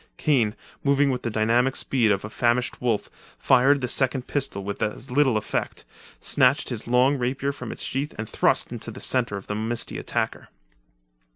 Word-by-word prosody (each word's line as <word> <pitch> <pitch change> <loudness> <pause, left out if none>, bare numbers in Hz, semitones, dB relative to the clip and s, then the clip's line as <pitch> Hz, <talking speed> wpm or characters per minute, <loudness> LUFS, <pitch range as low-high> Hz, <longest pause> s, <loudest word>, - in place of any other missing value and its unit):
Kane, 120 -8 +1 0.3
moving 140 0 +3
with 125 - -3
the 120 - -2
dynamic 115 +4 +2
speed 120 -5 +1
of 100 0 0
a - - -6
famished 120 +2 0
wolf, 115 -4 0 0.3
fired 135 +2 +4
the 125 - -1
second 130 0 +2
pistol 135 -9 -2
with 100 +1 -5
as 105 +4 -3
little 130 -3 +3
effect, 110 - -3 0.3
snatched 130 +3 +2
his 120 -4 -4
long 130 +3 +3
rapier 130 +3 -1
from 140 - -7
its - - -4
sheath 140 +2 -3
and 105 - -4
thrust - - +1
into - - -5
the - - -9
centre 120 -6 0
of 95 - -9
the - - -4
misty 110 +2 -1
attacker. - - -3
125 Hz, 180 wpm, -24 LUFS, 110-135 Hz, 0.3 s, fired